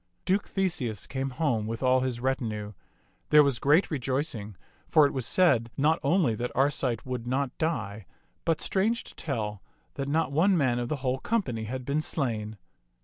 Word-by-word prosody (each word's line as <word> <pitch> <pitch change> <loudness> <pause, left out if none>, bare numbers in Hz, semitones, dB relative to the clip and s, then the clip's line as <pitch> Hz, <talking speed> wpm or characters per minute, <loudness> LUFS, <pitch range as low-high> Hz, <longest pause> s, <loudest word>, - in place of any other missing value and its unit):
Duke 195 +2 +1
Theseus 165 - -1
came 135 0 -3
home 125 -6 -1
with 115 +3 -4
all 130 0 +4
his 125 -2 -2
retinue. 110 -5 -2 0.6
There 150 0 +8
was 140 -4 +1
great 150 +7 +3
rejoicing, 130 -6 -2 0.3
for 155 - +5
it 140 - 0
was 130 -4 -1
said 130 -11 +3
not 155 +4 +3
only 155 -4 +2
that 120 +3 -3
Arcite 130 -4 +1
would 125 -2 -4
not 130 +1 -1
die, 110 - -2 0.4
but, 165 -2 0
strange 220 +5 0
to - - -13
tell, 105 - -4 0.3
that 140 -1 -4
not 145 -1 +1
one 175 +6 +3
man 130 -5 +2
of 120 - -3
the 145 -3 -3
whole 130 +1 +1
company 130 - -1
had 125 +3 -5
been 145 +3 0
slain. 110 -9 -2
130 Hz, 175 wpm, -28 LUFS, 115-155 Hz, 0.6 s, There